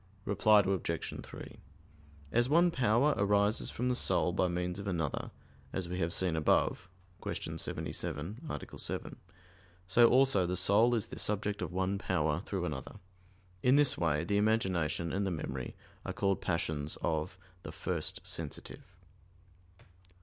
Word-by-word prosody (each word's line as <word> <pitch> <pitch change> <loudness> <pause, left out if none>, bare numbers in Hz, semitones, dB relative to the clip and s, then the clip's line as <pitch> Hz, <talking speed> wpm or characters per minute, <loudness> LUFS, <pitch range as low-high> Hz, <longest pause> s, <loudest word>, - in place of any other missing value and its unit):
Reply 105 +1 +5
Obj. 95 -4 -2
3: - - -10 0.8
As 120 +2 +2
one 170 +3 +5
power 130 +2 +3
arises 100 +1 +2
from 125 - -2
the 125 - +2
soul 105 -6 +2
by 90 - +2
means 90 +1 -2
of 100 - -6
another, 80 -6 -2 0.4
as 95 -2 -2
we 90 +1 -4
have 85 -1 0
seen 90 -2 +1
above 80 +3 +1 0.3
(Q. - - -4
77, 90 - -4
A. - - -6
7), - - -4 0.7
so 115 +6 +6
also 130 -8 +4
the 90 +1 -1
soul 105 +6 +4
is 110 - 0
the - - -6
subject 105 0 0
of - - -3
one 95 +2 -1
power 75 -4 0
through - - -3
another. - - -5 0.7
In 125 +5 +5
this 145 -2 +5
way 80 -3 +1
the 100 +4 0
imagination 95 -7 +1
and 100 - 0
the 95 - 0
memory 65 -7 -4 0.3
are - - -4
called 100 -1 0
passions 80 -4 -2
of 80 +3 -1 0.2
the - - -7
"first 90 +1 -4
sensitive." 85 -5 -5
95 Hz, 150 wpm, -32 LUFS, 85-105 Hz, 0.8 s, so